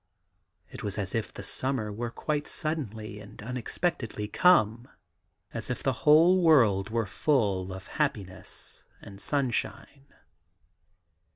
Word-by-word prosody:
It - - -8
was 100 -1 -4
as 100 -2 -3
if 115 -2 -2
the - - -9
summer 110 0 -2
were 120 +3 -3
quite 145 +4 -2
suddenly 110 - -3
and 105 -1 -13
unexpectedly 125 -2 -2
come; 120 - +4 0.7
as 115 0 -5
if 125 - -3
the 135 - +2 0.2
whole 170 +5 +7
world 115 - +4
were 115 0 0
full 100 -6 +1
of 95 0 -8
happiness 100 -11 -3 0.2
and 100 0 -10
sunshine. 140 0 -2
115 Hz, 120 wpm, -28 LUFS, 105-145 Hz, 0.7 s, whole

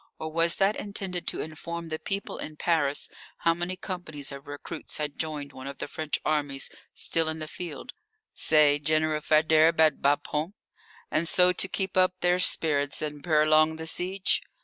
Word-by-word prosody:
Or 160 0 -5
was 165 +1 +3
that 195 +2 +2
intended 195 -3 -5
to - - -1
inform 165 +2 -6
the 155 0 -4
people 195 0 -3
in 155 - -6
Paris 150 -3 +1 0.3
how 165 - +2
many 175 +2 -4
companies 175 -7 -5
of 140 0 -9
recruits 145 0 -7
had 150 -1 -4
joined 150 -3 -4
one 130 +1 -9
of 140 - -7
the - - -5
French 155 0 -3
armies 145 -3 0 0.2
still 165 -1 +1
in 160 - -3
the 155 - -5
field 175 - -7 0.4
say, 150 -2 +4
General 155 0 +1
Faidherbe's, 155 +1 +4
at 155 -3 +4
Bapaume, 150 +5 0 0.6
and 160 +2 +1
so 180 +1 +6
to 195 - +1
keep 190 0 -2
up 185 0 +4
their 180 +1 +3
spirits 145 -5 +2
and 150 -1 -5
prolong 155 0 +4
the 160 0 -6
siege? 185 +3 0
155 Hz, 170 wpm, -27 LUFS, 150-175 Hz, 0.6 s, so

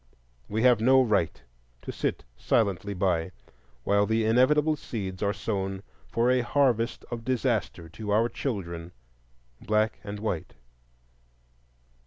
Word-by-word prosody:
We 110 +2 -1
have 125 -3 +5
no 130 +3 +6
right 105 -9 +1 0.4
to - - -5
sit - - -2
silently 100 - 0
by 90 -2 0 0.5
while 100 +5 +2
the 110 0 +1
inevitable 145 +7 +4
seeds 95 -9 -6
are 100 -1 +2
sown 95 -2 -3 0.2
for 115 - +2
a 130 -1 +3
harvest 120 -2 +1
of 115 -1 -4
disaster 115 -8 -1
to 105 +5 -7
our 110 +3 +3
children, 85 -10 -5 0.7
black 110 +1 +1
and 105 0 -6
white. 105 -7 -3
110 Hz, 125 wpm, -27 LUFS, 95-120 Hz, 0.7 s, no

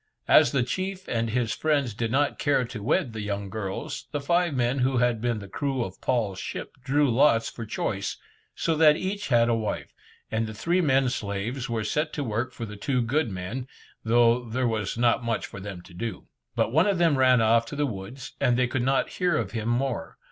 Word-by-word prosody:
As - - +6
the 135 -3 +2
chief 185 +8 -4
and 115 -1 -1
his 120 -1 0
friends 145 -7 0
did 115 +1 -2
not 145 +3 +1
care 145 -4 +2
to 115 -2 -7
wed 115 +2 +1
the 110 - -4
young 100 -1 -3
girls, 100 -3 -5
the 145 - -1
five 170 +4 +1
men 125 +2 +1
who 130 +1 +2
had 120 -2 +2
been 120 -1 0
the 100 -1 -8
crew 135 +4 -2
of - - -8
Paul's 110 -7 0
ship 100 - -6
drew 145 +3 +2
lots 115 -2 +3
for 115 -2 -7
choice, 100 -1 -2 0.4
so 165 - 0
that 155 -1 +6
each 200 +2 -3
had 120 -2 +4
a 120 - +2
wife, 110 -2 -3 0.4
and 110 0 0
the 110 - -7
three 170 - +1
men 135 -4 +3
slaves 120 +3 -3
were 115 -2 -1
set 150 +8 -1
to 145 - -2
work 120 +2 -2
for 120 -2 -6
the 105 -1 -9
two 125 +4 0
good 140 +3 +1
men, 100 +7 -5 0.4
though 120 +1 +4
there 120 +2 -1
was 110 -2 -2
not 120 0 +2
much 115 -1 -1
for - - -9
them 95 -2 -7
to 90 - -15
do. 105 +1 -5 0.3
But - - +1
one 160 +7 +4
of 200 -2 +2
them 170 -4 +4
ran 130 -1 +5
off 115 +1 +3
to 145 - -6
the 145 0 +1
woods, 120 +2 -7
and 120 -1 +3
they 125 - +3
could 120 +1 -1
not 135 +2 +2
hear 180 -3 +2
of 105 -5 -2
him 115 0 -2
more. 125 +1 -1
120 Hz, 220 wpm, -26 LUFS, 110-135 Hz, 0.4 s, As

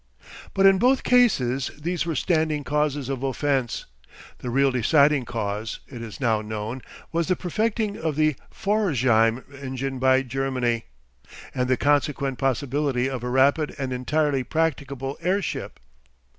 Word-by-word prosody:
But 195 0 +4
in 195 -1 +6
both 255 +4 +3
cases 135 - +3
these 170 +2 -2
were 165 - -1
standing 155 -1 +1
causes 150 -2 0
of 135 -2 -3
offence. 135 -2 -1 0.5
The 125 - -5
real 135 +2 +3
deciding 140 +2 +3
cause, 110 -1 -3
it 120 -4 -9
is 115 -3 -8
now 115 -5 +1
known, 110 +3 -5 0.3
was 165 0 0
the 185 - +2
perfecting 210 +4 -1
of 160 -2 -1
the 155 -1 +2 0.2
Pforzheim 130 - +2 0.2
engine 130 0 -4
by 130 +1 +4
Germany 125 -3 -1 0.7
and 125 -1 0
the 130 - +3
consequent 140 -2 +1
possibility 135 -1 0
of 125 -3 -5
a 125 - -2
rapid 140 +4 +2
and 135 -3 -3
entirely 140 +2 0
practicable 140 -2 -2
airship. 185 +3 -2
135 Hz, 140 wpm, -24 LUFS, 125-155 Hz, 0.7 s, in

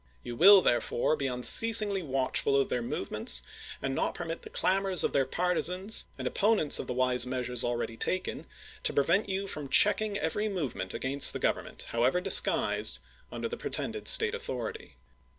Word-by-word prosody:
You 120 - -7
will, 195 +6 +7
therefore, 120 +4 0
be 140 -3 -3
unceasingly 200 - +3
watchful 135 -1 0
of 135 - -1
their 120 - -2
movements, 100 - -2 0.4
and 135 - -2
not - - -2
permit 165 -1 -6
the - - -12
clamors 190 -2 +1
of - - -1
their 135 -2 +1
partisans 180 +5 0
and - - -5
opponents 205 -8 +2
of - - -6
the - - -3
wise 125 -1 +1
measures 125 -1 -1
already 120 -1 -4
taken 185 +9 -4 0.3
to - - -2
prevent 175 +9 +1
you 195 +1 -3
from 150 -7 -6
checking 210 +3 +2
every 210 +6 -2
move 170 - -4
ment 95 - -5
against 140 +2 +5
the - - -4
Government, - - -3
however 125 +8 0
disguised, 190 +1 +2 0.3
under - - -5
the 470 0 -7
pretended 430 - -4
State 450 0 +4
authority. 470 -1 -7
160 Hz, 170 wpm, -28 LUFS, 125-200 Hz, 0.4 s, will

